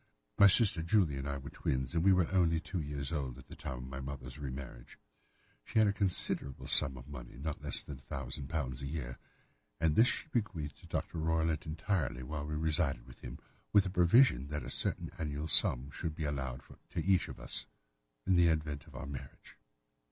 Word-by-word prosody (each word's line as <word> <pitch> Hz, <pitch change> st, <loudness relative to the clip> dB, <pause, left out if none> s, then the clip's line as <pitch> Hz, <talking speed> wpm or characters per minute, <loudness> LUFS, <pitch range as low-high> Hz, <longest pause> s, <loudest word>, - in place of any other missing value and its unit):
My 100 Hz, -, +10 dB
sister 100 Hz, -3 st, +7 dB
Julia 85 Hz, -5 st, +2 dB
and 70 Hz, +1 st, -4 dB
I 70 Hz, -, -2 dB
were 70 Hz, +1 st, -9 dB
twins, 65 Hz, +1 st, -2 dB
and 85 Hz, -1 st, +1 dB
we 95 Hz, -, +6 dB
were 90 Hz, -3 st, +3 dB
only 85 Hz, -3 st, +3 dB
two 90 Hz, +1 st, -4 dB
years 70 Hz, -1 st, -5 dB
old 65 Hz, -6 st, -3 dB
at 65 Hz, -, -13 dB
the -, -, -9 dB
time 65 Hz, -, -6 dB
of 60 Hz, -, -7 dB
my 70 Hz, +1 st, -6 dB
mother's 65 Hz, -1 st, -7 dB
re 70 Hz, -2 st, -4 dB
marriage. 65 Hz, 0 st, -9 dB, 0.7 s
She -, -, -5 dB
had 110 Hz, -1 st, +6 dB
a 100 Hz, -, +1 dB
considerable 90 Hz, -8 st, -1 dB
sum 65 Hz, -1 st, +7 dB
of 60 Hz, +2 st, -11 dB
money—not 70 Hz, +2 st, -7 dB
less -, -, 0 dB
than 70 Hz, -, -8 dB
£ -, -, -18 dB
1000 70 Hz, +2 st, -5 dB, 0.3 s
a -, -, -4 dB
year—and 75 Hz, +2 st, -5 dB
this 115 Hz, +7 st, +6 dB
she -, -, -1 dB
bequeathed 95 Hz, -, -3 dB
to -, -, -15 dB
Dr. 85 Hz, -, -3 dB
Roylott 80 Hz, -1 st, 0 dB
entirely 80 Hz, -, -2 dB
while 75 Hz, +2 st, -5 dB
we 75 Hz, -, -3 dB
resided 80 Hz, -4 st, 0 dB
with 60 Hz, -, -15 dB
him, -, -, -8 dB, 0.4 s
with 100 Hz, -1 st, +6 dB
a 95 Hz, -, -3 dB
provision 90 Hz, -, +4 dB
that 75 Hz, +1 st, -4 dB
a -, -, -6 dB
certain -, -, -2 dB
annual 75 Hz, -1 st, -3 dB
sum 70 Hz, -2 st, +2 dB
should 80 Hz, -1 st, -4 dB
be 80 Hz, -, -4 dB
allowed 65 Hz, -3 st, -3 dB, 0.3 s
to -, -, -3 dB
each 95 Hz, -1 st, +3 dB
of -, -, -9 dB
us -, -, -1 dB, 0.6 s
in 95 Hz, -, +3 dB
the 85 Hz, -1 st, +5 dB
event 80 Hz, -1 st, -1 dB
of 75 Hz, -, -15 dB
our 65 Hz, -, -6 dB
marriage. 70 Hz, -2 st, -10 dB
75 Hz, 205 wpm, -33 LUFS, 70-85 Hz, 0.7 s, My